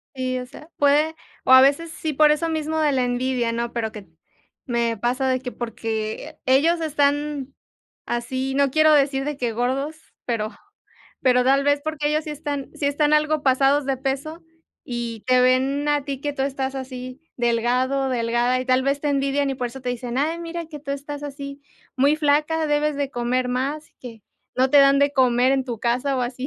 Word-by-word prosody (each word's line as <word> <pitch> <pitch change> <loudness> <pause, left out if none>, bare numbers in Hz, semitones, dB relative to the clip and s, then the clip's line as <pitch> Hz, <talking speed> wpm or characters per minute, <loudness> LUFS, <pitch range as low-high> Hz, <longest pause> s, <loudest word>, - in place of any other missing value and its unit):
Y, 255 -1 -2
o 250 - -6
sea, 300 +5 -14
puede, 295 +3 +3 0.3
o - - +2
a 260 0 +10
veces, 285 +5 +2
sí, 315 -1 -4
por 300 +2 +5
eso 305 +2 0
mismo 315 0 -2
de 305 -2 +2
la 260 -2 +1
envidia, 245 -1 0
¿no?, 235 0 -3
pero 225 -2 -2
que 210 -3 -10 0.6
me 235 -2 0
pasa 250 +5 0
de 255 0 +1
que 250 -1 -6
porque 220 -2 -5
ellos 320 +6 +3
están 290 -2 0 0.5
así, 260 +3 -2
no 280 -1 +2
quiero 310 +2 +5
decir 275 -2 +2
de 295 -1 -3
que 245 -3 -1
gordos, 265 +6 -2 0.3
pero 220 -3 -1 0.7
pero 250 -1 +4
tal 275 +2 +3
vez 285 0 +2
porque 305 -1 -2
ellos 305 +1 +1
sí 305 - -5
están 285 -2 -4
sí 285 - -2
están 295 +1 +1
algo 305 0 +2
pasados 275 +2 +3
de 270 -1 0
peso, 275 +5 -4 0.4
y 235 -3 -5
te 255 0 +4
ven 265 +3 +2
a 290 -1 +1
ti 275 -2 -5
que 290 0 -2
tú 270 - -3
estás 270 -1 -2
así, 255 0 -7 0.2
delgado, 250 +3 +1
delgada, 240 +1 +1
y - - -4
tal 255 0 +3
vez 275 +1 0
te 295 - -1
envidian, 275 0 0
y - - -2
por 250 -1 -3
eso 265 +3 -9
te 250 - -4
dicen: 245 0 -4
"Ay, 315 +4 0
mira 340 0 -5
que 310 -2 -9
tú 280 -1 -5
estás 285 +1 -6
así, 280 -1 -7 0.4
muy 280 +3 +3
flaca, 305 +1 +1
debes 295 0 +1
de 280 -1 -2
comer 250 0 -1
más, 275 +5 -3
que 230 -4 -10 0.3
no 260 +1 +2
te 290 - +6
dan 275 0 +6
de 285 0 +3
comer 255 -1 +3
en 270 -1 +1
tu 240 -3 -5
casa 250 +4 0
o - - 0
así". 255 +2 -4
270 Hz, 200 wpm, -23 LUFS, 250-290 Hz, 0.7 s, a